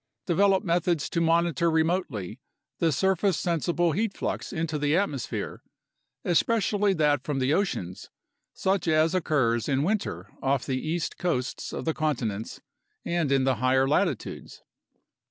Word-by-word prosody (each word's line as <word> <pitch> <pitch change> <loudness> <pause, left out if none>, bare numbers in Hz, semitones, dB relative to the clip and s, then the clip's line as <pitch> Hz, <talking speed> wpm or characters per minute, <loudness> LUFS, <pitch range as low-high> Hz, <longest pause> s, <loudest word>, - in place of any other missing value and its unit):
Develop 195 +2 +3
methods 170 -3 +1
to 170 - 0
monitor 170 -1 +2
remotely 160 - -1 0.4
the 165 -1 +2
surface 190 +3 +1
sensible 175 0 0
heat 210 +5 -1
flux - - -3
into 160 -4 -2
the 145 +2 +2
atmosphere, 150 -11 -3 0.6
especially 205 +2 +2
that 150 -4 +2
from 145 -2 -2
the 135 +2 +1
oceans, 95 - -2 0.4
such 190 -2 -1
as 160 +1 +3
occurs 135 -10 +1
in 135 0 +1
winter 155 - -2
off 135 -1 0
the 130 -1 -2
east 165 +1 -3
coasts 130 -8 -2
of - - -5
the 160 - +1
continents 120 -10 -2 0.4
and 170 -5 0
in 135 -1 +3
the 130 -2 +1
higher 130 +2 +3
latitudes. 145 - -2
160 Hz, 135 wpm, -27 LUFS, 135-175 Hz, 0.6 s, Develop